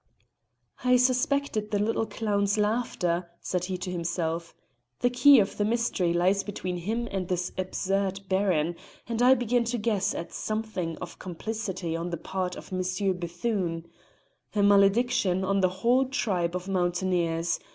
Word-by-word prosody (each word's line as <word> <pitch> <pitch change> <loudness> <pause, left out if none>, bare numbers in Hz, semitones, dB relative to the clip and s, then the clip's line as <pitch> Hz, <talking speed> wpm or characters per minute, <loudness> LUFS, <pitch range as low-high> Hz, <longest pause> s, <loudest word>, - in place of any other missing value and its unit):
"I 250 0 +5
suspected 250 -3 +1
the 210 - 0
little 220 +2 0
clown's 205 -2 0
laughter," 200 -6 0
said 180 -1 -2
he 185 0 -3
to 180 0 -5
himself. 170 -1 -3 0.5
"The 245 - +3
key 275 +2 +7
of 200 -1 0
the 205 - +1
mystery 215 -5 +1
lies 185 +3 +2
between 185 -3 -4
him 225 +7 -2
and 190 -2 -2
this 180 0 -1
absurd 195 +1 -1
Baron, 180 -4 +1 0.3
and 230 0 -2
I 255 +2 +7
begin 245 -1 +1
to 240 +1 -1
guess 210 -3 0
at 170 - -5
something 215 -6 -3
of 175 - -9
complicity 185 -2 -4
on 170 +1 -3
the 170 - -3
part 180 +2 -3
of - - -10
M. 185 - 0 0.4
Bethune. 175 -1 -2 0.7
A 205 - +3
malediction 200 -1 +4
on 195 +1 +1
the 185 -1 +3
whole 235 +8 +2
tribe 185 -9 -1
of 180 +1 -4
mountaineers! 175 -2 0
195 Hz, 150 wpm, -27 LUFS, 175-225 Hz, 0.7 s, key